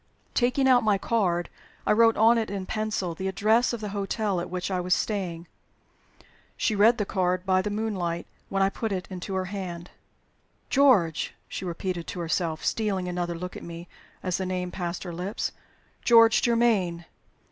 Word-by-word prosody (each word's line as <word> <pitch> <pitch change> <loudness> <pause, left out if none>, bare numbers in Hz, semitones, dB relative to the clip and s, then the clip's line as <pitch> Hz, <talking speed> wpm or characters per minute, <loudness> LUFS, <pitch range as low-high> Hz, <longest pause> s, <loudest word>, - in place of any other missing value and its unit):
Taking 255 +2 +2
out 250 -2 +5
my 210 -2 +3
card, 185 -6 0 0.4
I - - +2
wrote 225 +1 +5
on 230 +2 +5
it 220 - -2
in 195 -2 -4
pencil 215 -4 -2
the 190 +3 -4
address 215 +5 +2
of 235 -2 -4
the 210 - -4
hotel 200 -1 -1
at 175 - -6
which 180 +1 -3
I 185 - 0
was 180 0 +2
staying. 180 -6 -3 1.1
She 220 - +1
read 220 +4 +5
the 210 - 0
card 185 -1 0
by 185 -1 +3
the 210 - -3
moonlight 200 -6 -2 0.2
when 195 0 +1
I 195 - +3
put 225 +1 -3
it 185 -2 -3
into 185 +1 -5
her 185 0 -1
hand. 180 -3 -6 0.8
"George!" 245 - +3
she - - -5
repeated 175 0 -3
to - - -5
herself, 165 -1 -1
stealing 200 -5 0
another 175 -1 -2
look 180 +1 -6
at - - -7
me 170 +1 -8 0.4
as 185 -2 0
the 190 - -2
name 180 -1 -2
passed 175 -1 -4
her 175 -2 -6
lips. 180 +5 -3 0.5
"'George 230 -1 +6
Germaine.' 215 -8 +2
190 Hz, 180 wpm, -26 LUFS, 180-215 Hz, 1.1 s, George